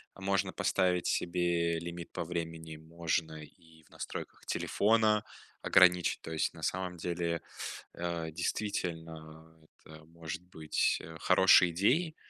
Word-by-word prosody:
можно 95 -1 0
поставить 90 -1 +1
себе 85 -1 +1
лимит 85 +1 -7
по - - -3
времени, 80 -1 -5
можно 80 -1 -3
и 80 +1 -18
в - - -25
настройках - - -7
телефона 110 0 +2 0.4
ограничить, 90 -2 +4
то - - -8
есть 80 -1 0
на 80 -1 -12
самом 90 0 -2
деле, 85 0 -2 0.5
э, 85 -2 -3
действительно 80 -4 -4 0.2
это 80 0 -14
может 80 0 -7
быть, 80 -4 0
э, 80 0 -10
хорошей 90 +2 +6
идеей 145 - +1
85 Hz, 120 wpm, -32 LUFS, 80-90 Hz, 0.5 s, хорошей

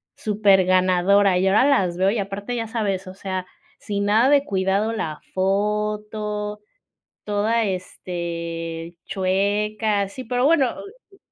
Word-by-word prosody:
superganadora". 190 -2 +3
Y 185 +1 +2
ahora 205 +7 +4
las 195 -12 +2
veo 190 +1 +3
y 215 +2 0
aparte 200 +4 -4
ya 225 -1 -3
sabes, 205 -5 -2
o 185 - -8
sea, 190 -1 -4 0.3
sin 200 -1 -3
nada 220 +5 +4
de 285 -1 +5
cuidado 195 0 0
la 160 -9 -4
foto, 210 +1 -1 0.6
toda, 215 +3 0
este, 170 -3 -5
chueca. 205 +2 0
Sí, 255 +6 -8
pero 245 +2 +1
bueno 285 -5 +3
oh 410 -2 -13
200 Hz, 125 wpm, -22 LUFS, 185-215 Hz, 0.6 s, de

